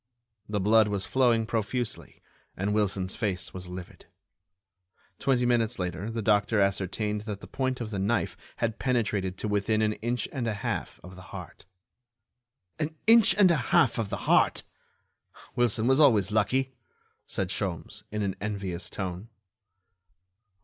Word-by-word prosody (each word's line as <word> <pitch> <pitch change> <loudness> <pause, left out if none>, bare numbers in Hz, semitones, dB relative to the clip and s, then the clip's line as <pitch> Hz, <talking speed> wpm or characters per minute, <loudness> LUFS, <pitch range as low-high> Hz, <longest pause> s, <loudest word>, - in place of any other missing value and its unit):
The 105 -1 0
blood 110 +2 +5
was 100 -2 -2
flowing 120 -4 +2
profusely, 115 +1 -3 0.3
and 100 +2 0
Wilson's 100 -3 0
face 95 -6 -2
was 90 -1 -7
livid. 90 0 -9 1.1
Twenty 125 -3 +2
minutes 120 -3 +1
later 90 +3 -3
the 115 -1 -3
doctor 105 0 +3
ascertained 100 +2 0
that 100 -2 -4
the - - -10
point 130 -1 -2
of 110 -2 -4
the 100 - -3
knife 105 +5 0 0.2
had 115 -1 -2
penetrated 105 -7 0
to 110 - -3
within 105 +1 +1
an 105 0 +2
inch 120 0 -1
and 125 -4 -2
a 110 - -1
half 100 - -4
of 90 +1 -11
the 90 - -11
heart. - - -9 1.1
"An 155 0 -2
inch 225 -1 +6
and 195 -4 +6
a 170 - +3
half 125 -2 +4
of 110 -3 -2
the - - -5
heart! - - +3 0.9
Wilson 115 -2 +2
always 135 +2 +4
was 110 -9 +5
lucky!" 130 +5 +1 0.5
said 95 -2 -2
Sholmes, 95 +2 -3
in 105 0 -2
an 95 -2 -1
envious 95 -4 -3
tone. 95 +3 -5
105 Hz, 150 wpm, -28 LUFS, 100-120 Hz, 1.1 s, inch